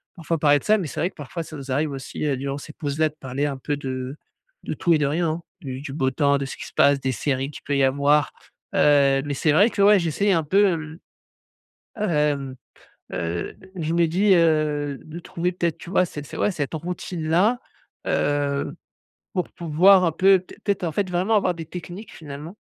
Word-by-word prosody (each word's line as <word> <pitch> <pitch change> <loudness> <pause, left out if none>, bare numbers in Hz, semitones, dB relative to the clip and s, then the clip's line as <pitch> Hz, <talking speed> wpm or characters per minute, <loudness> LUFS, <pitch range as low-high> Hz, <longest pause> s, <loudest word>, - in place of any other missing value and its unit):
parfois 165 -2 -2
parler 145 -1 +4
de - - -18
ça. 215 - +4
Mais 190 - -3
c'est - - -6
vrai 175 - +1
que - - -24
parfois, 150 +3 -6
ça 155 -1 -9
nous 135 -1 -7
arrive 150 +4 +1
aussi, 135 +1 -6
heu, 140 -3 0
durant 140 +1 -3
ces 150 - -10
pauses-là, 155 0 0
de 150 - -22
parler 135 +2 -2
un 140 -2 -3
peu 145 +2 -2
de 130 -1 -5 0.5
de - - -3
tout 170 - +2
et - - +4
de 150 - +2
rien, 165 +4 0
hein, 160 +2 -3 0.2
du 130 -4 -6
du 140 -1 -7
beau 135 -3 0
temps, 140 +1 +2
de 140 - -3
ce 135 - -6
qui - - -7
se - - -14
passe, 140 0 +5
des 130 - 0
séries 135 +2 -1
qu'il - - -11
peut 140 - -1
y - - +2
avoir, 140 +2 +3 0.4
heu. 140 -2 +4
Mais 145 - -2
c'est 150 +3 +1
vrai 200 +9 +5
que, 200 - -1
ouais, 205 +1 +7
j'ai 170 -2 -1
essayé 200 +6 +1
un 165 -2 +2
peu, 195 +7 +4
hem. 160 -2 -3 1.0
Hem, 150 -9 0 0.6
heu 85 0 -3
d 190 - -18
je 165 -2 -2
me 170 0 +4
dis, 190 +5 +3
heu, 155 -4 +2
de 155 +2 -8
trouver 175 +1 -2
peut-être, 170 -2 -1
tu 170 - -10
vois? 185 - +3
Cet 150 -3 -8
c - - -8
ouais, - - +1
cette 150 -5 -3
routine-là, 175 +5 0 0.5
heu, 145 0 0 0.6
pour 180 -2 -1
pouvoir 180 +4 +5
un 165 - +2
peu 190 +3 +5
peut-être 185 +3 -16
peut-être, 200 -3 0
en 165 - -1
fait, 200 +3 -1
vraiment 185 +5 +2
avoir 185 -3 +2
des 165 -1 -7
techniques, 180 +5 -8
finalement, 150 +4 -9
155 Hz, 225 wpm, -23 LUFS, 140-175 Hz, 1.0 s, ouais